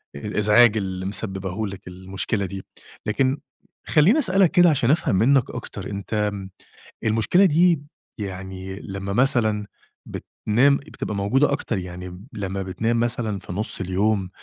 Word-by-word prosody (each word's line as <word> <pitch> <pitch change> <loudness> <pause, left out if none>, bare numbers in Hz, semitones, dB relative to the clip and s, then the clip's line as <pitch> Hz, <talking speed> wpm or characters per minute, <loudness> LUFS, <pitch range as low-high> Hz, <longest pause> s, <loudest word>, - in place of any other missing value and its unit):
الإزعاج 105 +6 +4
اللي 95 -2 -3
مسبّباه 95 0 -3
لك 95 -1 -9
المشكلة 95 +3 -2
دي. 95 +1 -6 0.4
لكن 130 +6 +1 0.5
خلّيني 180 - +5
أسألك 195 - +3
كده 175 -2 +6
عشان 135 -4 +2
أفهم 155 - +2
منّك 130 +5 +3
أكتر، - - -7
أنت 100 +1 -6
آمم، 100 -2 -1 0.5
المشكلة 115 - +3
دي 170 -1 +4 0.4
يعني 95 -1 -6
لمّا 100 0 -5
مثلًا 110 -4 +2 0.4
بتنام، 130 +6 +1
بتبقى 105 -6 -6
موجودة 130 +9 +2
أكتر؟ 120 -6 -2
يعني 90 +1 -7
لمّا 100 -2 -3
بتنام 110 +5 -1
مثلًا 115 -3 -1
في 90 - -8
نُص 105 +2 -4
اليوم 95 +1 0
105 Hz, 135 wpm, -23 LUFS, 95-125 Hz, 0.5 s, كده